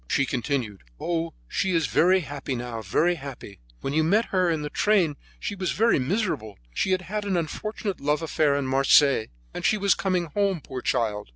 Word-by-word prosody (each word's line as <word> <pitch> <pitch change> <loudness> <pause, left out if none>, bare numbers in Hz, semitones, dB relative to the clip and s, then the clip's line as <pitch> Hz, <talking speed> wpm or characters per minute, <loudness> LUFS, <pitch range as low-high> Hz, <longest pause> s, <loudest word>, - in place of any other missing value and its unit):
She 140 - +2
continued: 125 -5 -2 0.2
"Oh, 165 -1 -2
she 185 0 0
is 165 -2 +2
very 185 +3 +3
happy 145 -3 -5
now, 120 -2 -5
very 150 - +2
happy. 135 - -9 0.2
When 135 - -3
you 155 +1 +3
met 205 +8 +2
her 185 -2 +3
in 160 -2 -1
the 150 - -5
train 190 -8 +2 0.2
she - - -3
was 190 -3 -2
very 230 -5 +3
miserable; 135 - -2 0.2
she 190 - 0
had 185 0 +1
had 210 +3 -3
an 195 -3 0
unfortunate 200 +5 -3
love 150 +3 0
affair 150 -2 +2
in 140 -1 -1
Marseilles, 135 -2 +4 0.3
and - - -6
she 215 - +3
was 200 -1 +3
coming 185 -3 0
home, 195 +2 0
poor 130 -3 -7
child. 110 - -1
160 Hz, 195 wpm, -25 LUFS, 135-190 Hz, 0.3 s, Marseilles